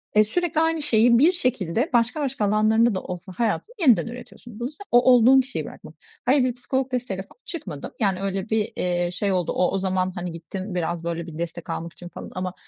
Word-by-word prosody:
eee, 215 - +7
sürekli 325 +7 0
aynı 325 -1 +1
şeyi 235 -3 +4
bir 320 +7 +6
şekilde 250 - -1
başka 240 +6 +2
başka 270 -6 -1
alanlarında 215 +2 +3
da 185 - -2
olsa 180 +1 -7
hayatın 240 - -1
yeniden 255 -9 +4
üretiyorsun. 240 -1 -10
Bunu 245 +3 -3
sen 400 +7 -11
o 245 - +7
olduğun 250 +2 +7
kişiyi 265 +1 -5
bırakman. - - -11 0.3
Hayır, 265 +1 +4
bir 250 -2 +1
psikolog 260 +1 -2
desteğiyle 225 -7 -2
falan - - -22
çıkmadım. 175 - -6
Yani, 195 -4 +1
öyle 195 +1 -3
bir, 220 -1 0
eee, 175 -1 0
şey 195 +2 -1
oldu 180 -3 0
o 180 - +1
o 195 - 0
zaman, 185 -1 0
hani, 175 -1 -4
gittim 185 +4 -6
biraz 170 -1 -2
böyle 170 0 -3
bir 155 -2 -8
destek 170 0 -5
almak 170 0 -4
için 175 - -11
falan - - -9
ama 185 0 -3
215 Hz, 215 wpm, -24 LUFS, 180-250 Hz, 0.3 s, eee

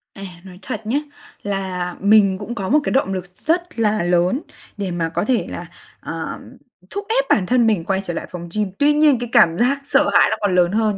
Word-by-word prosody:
À, 195 - -9 0.2
nói 185 -1 -12
thật - - -5
nhá, 235 +6 0 0.5
là 190 -3 -3
mình 200 -2 +4
cũng 220 +4 -6
có 195 -3 -4
một 295 +5 +5
cái - - -2
động 260 -7 +1
lực 185 -1 -4
rất 345 - -2
là 215 -4 +1
lớn 180 - +1 0.4
để 195 -3 -3
mà 165 -2 -2
có - - -2
thể 250 +1 +1
là, - - -6 0.3
ờ, - - -6 0.5
thúc 405 0 -5
ép - - +2
bản 190 - +3
thân 240 +3 +3
mình 210 -7 +1
quay 195 0 0
trở 175 -3 -5
lại - - -4
phòng 175 -1 -7
gym, 210 -3 -1
tuy 295 +1 +4
nhiên 295 -4 +4
cái 240 -1 -5
cảm 165 0 +5
giác 255 +4 +2
sợ 280 - +2
hãi - - +6
nó - - 0
còn 200 -3 +1
lớn 175 0 +3
hơn, 215 -1 +1
205 Hz, 230 wpm, -20 LUFS, 180-245 Hz, 0.5 s, hãi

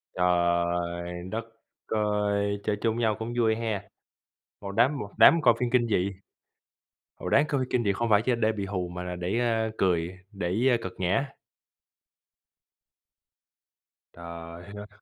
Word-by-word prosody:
Trời 85 0 0
đất 115 +1 -3 0.4
ơi! 105 -1 0
Chơi 105 - 0
chung 115 -1 +1
với 120 - -2
nhau 110 -2 +2
cũng 115 +2 -4
vui 110 -2 +3
ha, 110 -3 -2 0.8
một 100 -1 -6
đám 125 +8 +3
một 105 - -5
đám 165 -1 +7
coi 120 -4 +6
phim 125 -1 0
kinh 120 -1 +3
dị. 100 -2 +1 1.0
Ồ, - - -6
đáng 140 - +4
coi 140 -3 0
kinh 120 -2 +1
dị 100 - +2
không 115 +4 -1
phải 105 0 +5
chỉ 125 - +1
để 110 -1 +2
bị 100 -3 -4
hù 90 -2 -3
mà 90 +1 -6
là 90 0 -5
để, 90 +6 -1
a, 115 -2 +1
cười, 85 -3 +1 0.2
để, 100 +5 0
a, 120 - +4
cợt 95 - -5
nhã. 95 +10 +1 2.9
Trời 85 0 -9
ơi! 105 0 -8
105 Hz, 160 wpm, -27 LUFS, 90-115 Hz, 2.9 s, đám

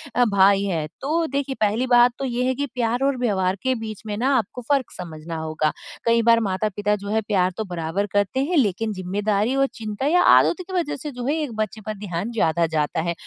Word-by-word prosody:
अ, 245 - +4
भाई 200 -2 +4
हैं। 165 -6 -1
तो 325 +4 0
देखिए 275 -1 -2
पहली 215 +4 +1
बात 245 0 +6
तो 275 - -2
ये 245 -1 -1
है 260 - +2
कि 285 +2 -1
प्यार 240 +1 0
और 275 -1 +1
व्यवहार 190 -6 +1
के 260 0 +1
बीच 220 -3 -6
में 210 -1 -3
ना 265 +4 +2
आपको 235 +2 -3
फ़र्क 275 -4 +1
समझना 165 -2 -7
होगा। 155 -1 -1 0.3
कई 230 0 +4
बार 230 0 +6
माता-पिता 205 0 -1
जो 200 0 -7
है 220 +1 +1
प्यार 190 -4 +1
तो 220 - -1
बराबर 165 +4 -2
करते 205 +5 +1
हैं 340 +4 0
लेकिन 220 -3 +1
ज़िम्मेदारी 205 +5 -1
और 275 0 +3
चिंता 215 +3 -5
या 355 +4 +4 0.2
आदतों 365 - +2
की 375 +1 -10
वजह 320 -4 -2
से 295 +2 -6
जो 245 -2 -6
है 290 - +1
एक 285 -6 -4
बच्चे 215 +1 -8
पर 215 - -3
ध्यान 195 +1 -4
ज़्यादा 170 -7 +1
जाता 150 +1 0
है। 170 +1 -1
215 Hz, 225 wpm, -23 LUFS, 190-255 Hz, 0.3 s, बात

